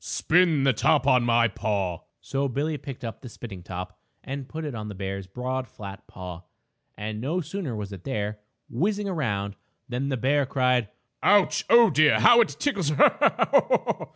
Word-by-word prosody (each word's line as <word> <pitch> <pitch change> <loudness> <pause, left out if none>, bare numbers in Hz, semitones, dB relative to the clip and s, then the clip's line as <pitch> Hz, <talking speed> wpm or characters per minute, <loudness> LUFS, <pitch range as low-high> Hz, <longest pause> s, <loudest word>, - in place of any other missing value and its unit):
"Spin 165 -4 +2
the 135 -1 +4
top 125 - +2
on 130 -3 +4
my 120 -1 +3
paw." 100 -5 -2 0.2
So 140 0 -2
Billie 145 +4 -2
picked 130 -3 -8
up 115 - -7
the 125 - -9
spinning 105 -5 -9
top 90 +1 -7 0.2
and 135 0 -6
put 160 0 -5
it 145 - -4
on 105 -2 -6
the 105 - -7
bear's 95 0 -5
broad, 130 +5 -4
flat 100 -2 -10
paw. 90 -2 -8 0.6
And, 105 +1 -5
no 155 +8 -1
sooner 165 - -4
was 105 -2 -6
it 95 -2 -10
there, 105 -5 -3 0.3
whizzing 200 - -1
around, 105 - -2 0.3
than 130 +3 -3
the 135 - -1
bear 140 +3 +1
cried: 125 -4 +1 0.3
"Ouch! 205 -2 +3
Oh, 235 0 +7
dear! 150 +1 +4
How 235 0 +7
it 230 - +2
tickles. 200 - 0
Ha! 150 - +4
Ha! - - +3
Ha! - - +2
125 Hz, 180 wpm, -25 LUFS, 105-150 Hz, 0.6 s, Oh